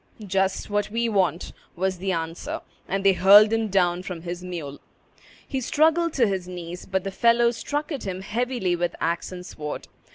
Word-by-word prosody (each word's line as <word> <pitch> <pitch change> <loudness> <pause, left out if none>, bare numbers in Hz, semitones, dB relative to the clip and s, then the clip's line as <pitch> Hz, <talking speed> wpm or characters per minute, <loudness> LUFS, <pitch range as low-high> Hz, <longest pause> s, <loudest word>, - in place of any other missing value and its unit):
"Just 190 0 0
what 205 0 0
we 230 +2 0
want," 185 -6 0 0.2
was 185 +1 -1
the 190 +1 -1
answer; 165 -1 -3 0.3
and 195 +1 -2
they 195 - +7
hurled 205 +4 +7
him 225 -1 +1
down 180 -3 +2
from 180 -3 -7
his 175 +1 -5
mule. 165 -6 -6 0.7
He 265 - -2
struggled 320 +5 +2
to 250 - +3
his 190 -3 -2
knees; 175 -1 -7
but 190 -1 -1
the 195 - -3
fellows 235 +3 +3
struck 295 +5 -3
at 280 -5 -4
him 185 0 -4
heavily 225 -3 -1
with 175 0 -2
axe 170 +2 -1
and 180 -1 -8
sword. 150 -3 -6
190 Hz, 185 wpm, -25 LUFS, 175-225 Hz, 0.7 s, they